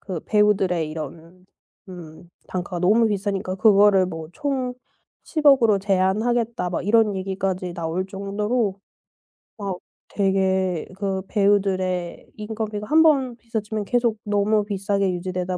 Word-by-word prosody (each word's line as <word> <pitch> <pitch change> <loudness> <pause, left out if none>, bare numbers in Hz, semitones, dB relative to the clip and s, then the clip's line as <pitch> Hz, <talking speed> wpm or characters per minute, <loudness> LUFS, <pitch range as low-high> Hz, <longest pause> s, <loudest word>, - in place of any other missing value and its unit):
그 185 -5 -5
배우들의 190 -6 +2
이런 165 +4 -9 0.4
음 170 -2 -11 0.2
단가가 180 -1 -4
너무 220 +6 +4
비싸니까 195 -2 -2
그거를 200 -2 +5
뭐 160 -3 -7
총 265 -2 -2 0.5
1,000,000,000 290 -5 +4
으로 210 -3 +4
제한하겠다 210 +3 0
막 175 - -3
이런 215 -1 +3
얘기까지 190 -1 -3
나올 170 +3 -3
정도로 200 +2 -2 0.8
막 195 -4 -4 0.3
되게 190 -3 0
그 195 -1 -2
배우들의 190 -3 0
인건비가 215 -1 -5
한번 300 -5 +4
비싸지면 220 -2 -4
계속 235 -1 +1
너무 210 +1 +1
비싸게 200 -1 -1
유지되다 180 0 -3
195 Hz, 270 characters per minute, -23 LUFS, 185-215 Hz, 0.8 s, 그거를